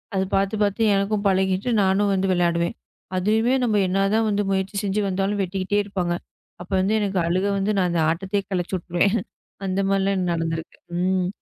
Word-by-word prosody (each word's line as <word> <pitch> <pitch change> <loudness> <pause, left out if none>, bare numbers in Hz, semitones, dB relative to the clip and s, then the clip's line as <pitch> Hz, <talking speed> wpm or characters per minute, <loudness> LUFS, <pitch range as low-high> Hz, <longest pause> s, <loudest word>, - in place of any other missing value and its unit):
அது 190 0 +1
பாத்து 195 +2 +1
பாத்து 205 +2 0
எனக்கும் 200 +1 0
பழகிட்டு 190 +3 +1
நானும் 200 +1 +2
வந்து 195 0 +1
விளையாடுவேன். 170 -1 +1 0.4
அதுவுமே 220 +6 +2
நம்ம 215 -4 +2
என்னதான் 200 +3 +1
முயற்சி 190 +1 -1
செஞ்சு 205 +1 0
வந்தாலும் 195 +2 -1
வெட்டிக்கிட்டே 190 +2 -1
இருப்பாங்க. 180 -4 -2 0.5
அப்போ 180 +2 -7
வந்து 195 +3 +1
எனக்கு 200 -2 0
அழுக 185 +3 +1
வந்து 195 +2 0
நான் 185 -2 +2
அந்த 170 -1 +1
ஆட்டத்தையே 195 +4 -2
கலைச்சு 180 0 -1
விட்டுருவேன். 180 +5 +1 0.5
அந்த 190 0 -1
மாதிரி 195 0 +2
எல்லாம் 190 -2 0
நடந்துருக்கு. 165 -1 -3 0.2
ம். 185 0 +1
195 Hz, 165 wpm, -23 LUFS, 185-200 Hz, 0.5 s, நானும்